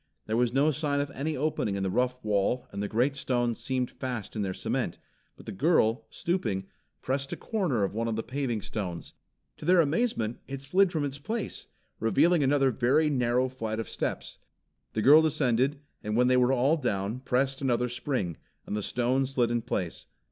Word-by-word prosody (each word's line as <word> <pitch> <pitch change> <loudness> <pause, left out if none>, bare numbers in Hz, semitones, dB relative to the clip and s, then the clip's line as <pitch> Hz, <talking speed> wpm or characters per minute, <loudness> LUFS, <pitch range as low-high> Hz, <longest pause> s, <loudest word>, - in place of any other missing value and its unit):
There 110 - -1
was 120 0 +2
no 140 +4 +3
sign 145 -1 -1
of 145 0 -2
any 150 +2 -3
opening 130 -8 -1
in 100 - -2
the 95 - 0
rough 125 +3 +1
wall 105 +4 +1
and 100 - -4
the 105 - -1
great 125 +7 +1
stones 120 -4 -1
seemed 130 -2 -2
fast 125 -7 -5
in 110 - -1
their 95 -2 -1
cement, - - -2 0.4
but - - -14
the - - -5
girl, 110 - +2
stooping, 110 - -2 0.4
pressed 135 +1 -2
a - - -5
corner 175 - 0
of 100 - -1
one 115 +2 -1
of 115 - -1
the 110 - -2
paving 125 -4 -2
stones. 90 -6 -5 0.4
To - - -9
their 180 +1 +5
amazement 150 - +1
it 135 0 -6
slid 185 +6 +3
from 155 -4 0
its 140 0 -5
place, 215 +9 -4 0.3
revealing 150 - +3
another 135 -1 +3
very 140 +7 +2
narrow 125 -1 +2
flight 115 -4 -4
of 115 - -3
steps. - - -4 0.5
The 110 - -1
girl 150 +4 +8
descended, 140 -3 +1 0.2
and 105 +1 -1
when 125 +1 +4
they 130 - +4
were 125 0 +4
all 135 +5 +3
down, 105 -4 -2
pressed 135 +1 0
another 125 -2 +1
spring, 125 - -2 0.3
and - - -4
the 105 - -1
stone 125 +5 0
slid 125 -3 +1
in 120 0 +1
place. 95 -7 -4
125 Hz, 195 wpm, -28 LUFS, 115-140 Hz, 0.5 s, girl